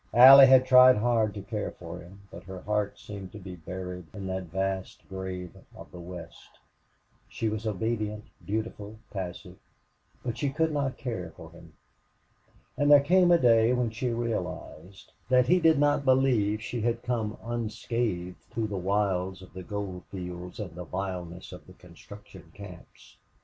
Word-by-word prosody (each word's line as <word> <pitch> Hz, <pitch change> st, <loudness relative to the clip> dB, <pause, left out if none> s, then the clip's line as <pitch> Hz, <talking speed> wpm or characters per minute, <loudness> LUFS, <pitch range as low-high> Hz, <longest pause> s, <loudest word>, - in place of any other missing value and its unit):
Allie 135 Hz, +2 st, +11 dB
had 130 Hz, -1 st, +6 dB
tried 130 Hz, -1 st, +7 dB
hard 110 Hz, -2 st, +1 dB
to 100 Hz, -, -6 dB
care 105 Hz, 0 st, -4 dB
for 85 Hz, 0 st, -8 dB
him, 95 Hz, +3 st, -14 dB
but -, -, -11 dB
her 95 Hz, -1 st, -8 dB
heart 105 Hz, -1 st, -1 dB
seemed 100 Hz, -3 st, -9 dB
to -, -, -8 dB
be 95 Hz, -2 st, -9 dB
buried 90 Hz, +1 st, -7 dB
in 100 Hz, -2 st, -6 dB
that 95 Hz, 0 st, -3 dB
vast 95 Hz, +2 st, -4 dB
grave 95 Hz, -2 st, -6 dB, 0.2 s
of -, -, -12 dB
the 90 Hz, -, -10 dB
West. 85 Hz, -1 st, -11 dB, 0.7 s
She 110 Hz, -, -2 dB
was 110 Hz, +1 st, -4 dB
obedient, 105 Hz, 0 st, -2 dB, 0.2 s
dutiful, 110 Hz, 0 st, -4 dB
passive, 95 Hz, -3 st, -7 dB, 0.7 s
but 120 Hz, -1 st, -3 dB
she 145 Hz, -, 0 dB
could 160 Hz, +3 st, 0 dB
not 140 Hz, -3 st, -2 dB
care 105 Hz, -, -5 dB
for -, -, -11 dB
him. -, -, -16 dB, 1.0 s
And 145 Hz, 0 st, +2 dB
there 145 Hz, -1 st, +8 dB
came 180 Hz, +4 st, +4 dB
a 175 Hz, -, +6 dB
day 115 Hz, -4 st, +4 dB
when 125 Hz, -2 st, 0 dB
she 120 Hz, +3 st, -2 dB
realized 110 Hz, -6 st, -5 dB, 0.2 s
that 125 Hz, -1 st, +5 dB
he 180 Hz, +8 st, +4 dB
did 160 Hz, -2 st, +4 dB
not 145 Hz, 0 st, +2 dB
believe 125 Hz, -6 st, +2 dB
she 120 Hz, -1 st, -4 dB
had 120 Hz, +1 st, -1 dB
come 115 Hz, -4 st, -2 dB
unscathed 110 Hz, -5 st, -3 dB
through 110 Hz, -2 st, -3 dB
the 100 Hz, -, -3 dB
wilds 95 Hz, -1 st, -1 dB
of 90 Hz, -, -15 dB
the 95 Hz, -, -7 dB
gold 95 Hz, -1 st, -6 dB
fields 90 Hz, 0 st, -7 dB
and 100 Hz, -6 st, -6 dB
the 90 Hz, +1 st, -7 dB
vileness 90 Hz, -1 st, -6 dB
of 90 Hz, -, -12 dB
the 95 Hz, -, -14 dB
construction 90 Hz, 0 st, -14 dB
camps. 90 Hz, -11 st, -13 dB
105 Hz, 165 wpm, -28 LUFS, 90-120 Hz, 1.0 s, Allie